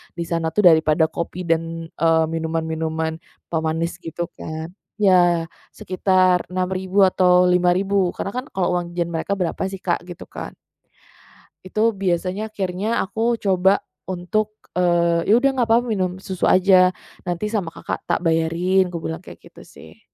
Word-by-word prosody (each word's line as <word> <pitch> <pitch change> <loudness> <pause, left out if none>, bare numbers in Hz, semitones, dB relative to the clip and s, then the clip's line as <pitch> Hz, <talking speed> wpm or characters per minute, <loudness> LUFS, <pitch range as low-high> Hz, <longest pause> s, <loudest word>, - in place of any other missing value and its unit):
di 170 - -3
sana 165 -1 -2
tuh 210 - +3
daripada 160 0 +3
kopi 175 +2 -4
dan, 165 0 -2
eee, 165 0 +4
minuman-minuman 160 0 -2 0.3
pemanis 165 +1 -1
gitu 165 +1 -5 0.2
kan. 160 +2 -6 0.3
Iya, 175 -4 +4 0.2
sekitar 185 -1 +2
Rp6.000 185 +1 +2
atau 180 -1 +4
Rp5.000 180 +1 +2
karena 195 - -5
kan 255 +2 -3
kalau 180 -2 0
uang 175 -1 -3
jajan 175 -1 -2
mereka 165 +3 -4
berapa 175 -2 -2
sih 195 - -7
Kak, 175 -2 -1
gitu 175 0 -10
kan. - - -7 1.2
Itu 215 +4 +2
biasanya, 190 +2 -1
akhirnya, 195 -1 -3 0.2
aku 225 +4 0
coba 190 0 +3 0.2
untuk, 210 +4 -2 0.2
eee, 170 -1 +2
"Ya 210 - +6
udah 275 +2 +3
nggak 235 - +1
papa 235 +2 +4
minum 185 -5 -1
susu 185 -2 -1
aja, 185 -1 +5 0.4
nanti 175 +4 -2
sama 205 -6 -1
Kakak - - -4
tak - - +1
bayarin," 170 +3 +2
aku 170 -2 -5
bilang 160 +1 -4
kayak - - -13
gitu - - -15
sih. - - -15
180 Hz, 150 wpm, -21 LUFS, 165-190 Hz, 1.2 s, Ya